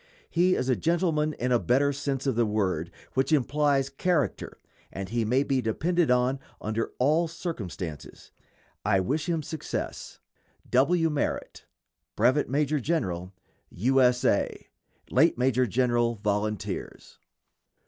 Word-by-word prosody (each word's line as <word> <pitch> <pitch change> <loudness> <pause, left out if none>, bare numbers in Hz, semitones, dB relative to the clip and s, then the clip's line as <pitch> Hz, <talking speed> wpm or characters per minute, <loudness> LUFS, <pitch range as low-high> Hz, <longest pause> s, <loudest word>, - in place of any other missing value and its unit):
He 180 +2 +3
is 125 - -1
a 130 - +3
gentleman 160 -2 +1
in 125 -2 -2
a 120 - +4
better 140 +5 +2
sense 140 -1 -3
of 135 - +2
the 120 - +3
word 95 -6 -1 0.2
which 135 +3 +1
implies 145 -1 +2
character, 150 +2 -1 0.3
and 95 0 -5
he 115 +1 0
may 125 +5 +2
be 135 -2 0
depended 165 +9 0
on 125 +2 +2 0.2
under 110 +2 -2
all 155 +6 +2
circumstances. 100 - -7 0.5
I 95 -1 +3
wish 145 - -1
him 165 -2 0
success. 160 +2 -5 0.5
W. 165 +5 +3
MERRITT, 150 - -3 0.5
Brevet 130 +7 +2
Major 145 +2 +1
General 95 - -2 0.4
U. 130 +8 +2
S. 125 -1 +3
A. - - 0 0.4
_Late - - +4
Major 125 0 +2
General 120 0 +1
Volunteers. 105 -1 -3
130 Hz, 130 wpm, -27 LUFS, 115-150 Hz, 0.5 s, a